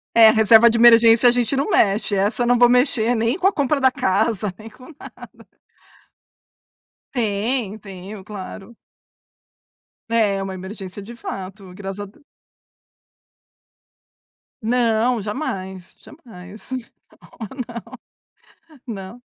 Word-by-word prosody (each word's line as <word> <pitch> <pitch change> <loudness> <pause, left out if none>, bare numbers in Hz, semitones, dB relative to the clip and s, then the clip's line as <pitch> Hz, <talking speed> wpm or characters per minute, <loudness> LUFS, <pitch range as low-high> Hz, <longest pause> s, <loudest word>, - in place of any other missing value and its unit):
É, 225 -1 +8
reserva 220 +1 +6
de 230 - -1
emergência 230 0 +6
a - - +4
gente 245 +1 0
não 275 +8 -1
mexe, 210 - +2
essa 205 +4 0
eu - - -1
não 245 0 +3
vou 245 0 +6
mexer 245 -1 +2
nem 230 +7 0
com 375 - +2
a 395 - +1
compra 285 0 0
da 265 -1 +4
casa, 210 -1 0
nem 215 - -11
com 255 +3 -15
nada. - - -11 2.0
Tenho, 220 -1 -2
tenho, 195 0 -10
claro. 205 +2 -10 1.3
É, 220 -4 +1
é 195 - -3
uma 195 -1 -5
emergência 190 +1 -9
de 230 +4 -10
fato. 190 -3 -8
Graças 195 0 -7
a 205 - -5
De 200 - -20 2.4
Não, 235 0 +1
jamais, 190 - -6
jamais. 210 - -13 0.7
Não, 220 -4 -6 1.4
não. 200 0 -8
Não. - - -28
220 Hz, 125 wpm, -20 LUFS, 195-240 Hz, 2.4 s, É